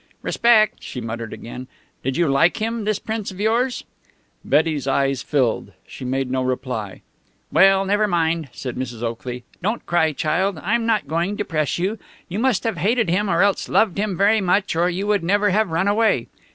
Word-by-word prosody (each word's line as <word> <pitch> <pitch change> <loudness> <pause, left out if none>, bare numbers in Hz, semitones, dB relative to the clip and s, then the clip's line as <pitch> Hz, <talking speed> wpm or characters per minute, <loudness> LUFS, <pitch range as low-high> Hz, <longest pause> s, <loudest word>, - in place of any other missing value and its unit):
"Respect!" 225 -3 +3
she 125 - -7
muttered 115 -1 -5
again. 125 +2 -8 0.4
"Did 135 +1 -1
you 170 -1 +2
like 140 +5 +3
him, 225 0 -2
this 215 -1 +1
Prince 220 -1 -4
of 190 - -10
yours?" 235 +4 +1 0.6
Betty's 150 -5 +1
eyes 135 -1 +1
filled. 130 -6 0
She - - -10
made 130 0 -2
no 130 0 0
reply. 125 -6 -3 0.5
"Well, 195 0 +5
never 205 +2 +2
mind," 165 -4 0
said 125 +1 -6
Mrs. 120 -2 -5
Oakley. 120 +1 -4 0.2
"Don't 215 +6 -2
cry, 165 -2 +2
child! 180 +6 0
I'm 230 +4 0
not 215 -10 +1
going 170 +7 -1
to 205 - -2
press 155 -4 -1
you. 195 +5 -2 0.3
You 190 +4 -4
must 255 -3 +1
have 225 -5 -1
hated 220 +3 +1
him 200 +3 +1
or - - +3
else 200 -1 +1
loved 200 -4 +2
him 205 -4 -1
very 210 +2 +4
much, 190 0 +1
or 170 +2 +2
you 185 +3 -3
would 205 -3 +1
never 205 +3 +2
have 215 +1 +2
run 165 +4 0
away.... 220 +2 +2
180 Hz, 190 wpm, -21 LUFS, 135-210 Hz, 0.6 s, Well